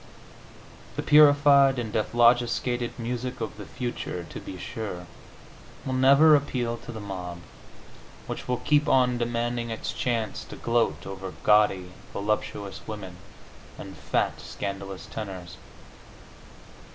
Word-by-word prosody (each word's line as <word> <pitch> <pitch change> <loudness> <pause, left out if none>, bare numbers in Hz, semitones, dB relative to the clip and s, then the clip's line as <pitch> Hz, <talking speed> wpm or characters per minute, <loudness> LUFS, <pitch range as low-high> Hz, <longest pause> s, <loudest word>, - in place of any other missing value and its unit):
The - - -3
purified 145 -2 +6
and 115 -3 -3
dephlogisticated 120 +1 +2
music 125 +1 -4
of 110 -2 -5
the 105 - -9
future, 120 -8 -4
to - - -6
be - - -8
sure, 100 -6 -6 0.8
will 130 - -2
never 140 +4 +7
appeal 125 -5 -1
to 120 - -10
the 110 - -7
mob, 90 -4 -6 0.8
which - - -6
will 125 0 0
keep 150 +2 +2
on 125 -2 +3
demanding 120 0 -1
its 115 - -4
chance 115 -4 -2
to - - -9
gloat 120 0 0
over 95 -1 -7
gaudy, 105 -4 +3 0.2
voluptuous 100 -1 -3
women, 95 -5 -7 0.6
and - - -9
fat, - - -1
scandalous 100 -1 -6
tenors. 95 -5 -7
115 Hz, 120 wpm, -26 LUFS, 100-125 Hz, 0.8 s, never